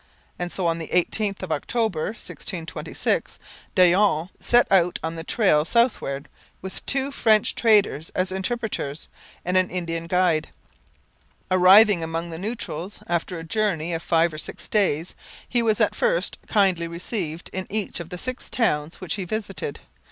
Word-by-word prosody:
And 175 0 -3
so 185 - -2
on 165 0 +1
the 160 - -5
18th 195 +2 0
of 180 - -5
October 190 +1 -1
1626 185 -5 -3 0.4
Daillon 180 -2 +4
set 240 0 +4
out 180 -2 +4
on 160 0 -2
the 165 - -6
trail 170 -6 +3
southward, 165 - 0 0.3
with 190 0 -7
two 275 0 +2
French 220 -6 +3
traders 205 -9 +3
as 185 0 0
interpreters, 190 -7 -3 0.4
and 180 +1 +1
an 185 -1 +3
Indian 165 -2 -3
guide. 170 -3 +2 1.0
Arriving 185 +1 +7
among 165 +1 -4
the 160 - -6
Neutrals, 200 -3 -5
after 175 +1 -2
a 165 - -7
journey 170 -2 -1
of 165 - -2
five 165 -1 +2
or 155 - -6
six - - -7
days, 180 -6 +1 0.3
he 245 - +1
was 220 -2 +1
at - - +3
first - - +1
kindly 190 -5 +2
received 170 -1 -4
in 185 0 -4
each 210 -2 -1
of 170 -1 -7
the 180 - -6
six 255 +7 -5
towns 155 -9 +1
which 180 -4 -3
he 200 - -3
visited. 195 -6 -4
180 Hz, 155 wpm, -24 LUFS, 165-210 Hz, 1.0 s, Arriving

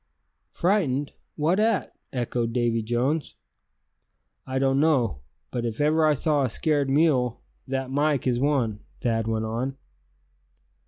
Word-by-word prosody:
"Frightened; 155 -8 +1 0.2
what 165 +6 +1
at?" 215 - +1 0.2
echoed 120 -2 -2
Davy 120 -1 +1
Jones. 125 +7 -1 1.1
"I 130 0 -2
don't 135 0 +2
know; 130 - +2 0.3
but 120 - -2
if 115 -2 -3
ever 155 +2 +3
I 150 - +4
saw 150 0 +1
a 130 - +1
scared 145 +3 +1
mule, 135 -5 +2 0.2
that 135 0 -3
Mike 145 -1 +1
is 125 -2 +1
one," 130 -7 +1 0.2
Thad 115 -3 0
went 110 0 -1
on. 125 +5 -3
135 Hz, 130 wpm, -25 LUFS, 120-150 Hz, 1.1 s, I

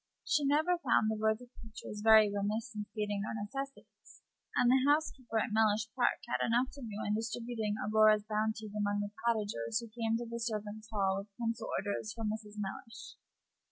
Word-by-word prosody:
She 295 - +2
never 315 +5 +3
found 230 -7 +3
the - - -1
worthy 220 +3 0
creatures 215 -1 -8
very 220 -1 +8
remiss 210 +3 -2
in 210 -1 -4
stating 210 -2 -2
their 215 - -3
necessities, 270 +6 -7 0.3
and 245 - +4
the 260 0 +5
housekeeper 280 -6 +1
at 220 - 0
Mellish 215 0 +3
Park 250 -2 +3
had 240 - 0
enough 240 +3 +2
to 280 - -11
do 215 -3 -5
in 205 - +1
distributing 225 -1 -2
Aurora's 215 0 +4
bounties 215 0 -2
among 205 0 0
the 205 0 -4
cottagers 210 - 0
who 235 -1 -8
came 225 0 0
to 240 - -4
the 235 0 -5
servants' 215 -1 -4
hall 195 -2 +1
with 200 - -8
pencil 230 -1 -2
orders 205 +2 -3
from 225 -2 -2
Mrs. 215 -1 -7
Mellish. 210 +3 -7
220 Hz, 180 wpm, -33 LUFS, 210-235 Hz, 0.3 s, very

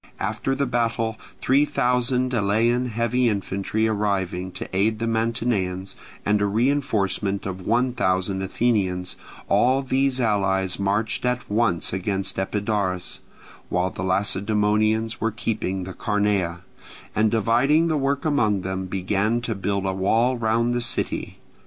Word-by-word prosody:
After 110 +6 -1
the 140 +1 0
battle 115 -2 -1 0.2
three 135 +3 +4
thousand 125 -2 +1
Elean 115 +3 +2
heavy 120 +2 +1
infantry 100 +2 -1
arriving 95 -4 -1
to - - -6
aid 110 +3 +2
the 115 - -2
Mantineans, 110 -5 -1 0.3
and 105 0 +2
a 100 - +2
reinforcement 105 -5 0
of 95 -1 -5
one 125 +2 +2
thousand 95 -4 0
Athenians, 95 -3 0 0.3
all 130 +2 +3
these 135 0 +1
allies 95 -5 +1
marched 100 +3 0
at 125 0 -1
once 105 -7 +1
against 95 0 -2
Epidaurus, 100 -2 -2 0.5
while 90 +1 0
the - - -7
Lacedaemonians 105 +3 +1
were 115 - +2
keeping 105 -3 -2
the 95 +1 -7
Carnea, 100 -5 0 0.5
and 110 +1 +3
dividing 120 +9 +3
the 160 - +1
work 140 0 0
among 110 -10 +2
them 95 0 -3
began 100 +5 0
to 115 -1 -2
build 100 -1 -2
a 95 - 0
wall 115 +7 +2
round 115 +1 +1
the 120 - 0
city. - - -2
110 Hz, 135 wpm, -23 LUFS, 95-120 Hz, 0.5 s, three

